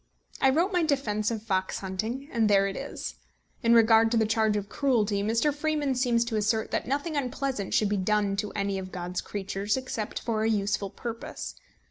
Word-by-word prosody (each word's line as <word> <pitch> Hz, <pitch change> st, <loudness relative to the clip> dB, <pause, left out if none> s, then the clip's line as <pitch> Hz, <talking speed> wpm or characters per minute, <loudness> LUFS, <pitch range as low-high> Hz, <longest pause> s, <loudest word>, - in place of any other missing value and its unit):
I 270 Hz, -, +6 dB
wrote 340 Hz, +8 st, +2 dB
my 360 Hz, -, +3 dB
defence 225 Hz, -9 st, 0 dB
of 225 Hz, -2 st, -4 dB
fox 190 Hz, -3 st, -1 dB
hunting, 220 Hz, +8 st, -3 dB
and 225 Hz, -3 st, +2 dB
there 195 Hz, -1 st, +5 dB
it 195 Hz, 0 st, -2 dB
is. -, -, -6 dB, 0.4 s
In 235 Hz, -1 st, +5 dB
regard 225 Hz, 0 st, +6 dB
to 235 Hz, -, +1 dB
the 220 Hz, -, +3 dB
charge 220 Hz, -1 st, +2 dB
of 205 Hz, -1 st, -3 dB
cruelty, 220 Hz, -6 st, +1 dB
Mr. 230 Hz, +8 st, +1 dB
Freeman 295 Hz, -2 st, 0 dB
seems 245 Hz, -2 st, +2 dB
to 230 Hz, -2 st, -2 dB
assert 215 Hz, +1 st, 0 dB
that -, -, -1 dB
nothing 285 Hz, +5 st, -1 dB
unpleasant 265 Hz, -5 st, -2 dB
should 210 Hz, -, +3 dB
be 205 Hz, -, +1 dB
done 205 Hz, +1 st, +1 dB
to 210 Hz, 0 st, -2 dB
any 200 Hz, -1 st, -1 dB
of 185 Hz, 0 st, -7 dB
God's 180 Hz, 0 st, -4 dB
creatures 200 Hz, +2 st, -2 dB
except 255 Hz, -4 st, -4 dB
for 225 Hz, -2 st, -1 dB
a 220 Hz, -, +2 dB
useful 205 Hz, -2 st, 0 dB
purpose. 230 Hz, +3 st, -6 dB
220 Hz, 195 wpm, -28 LUFS, 205-255 Hz, 0.4 s, I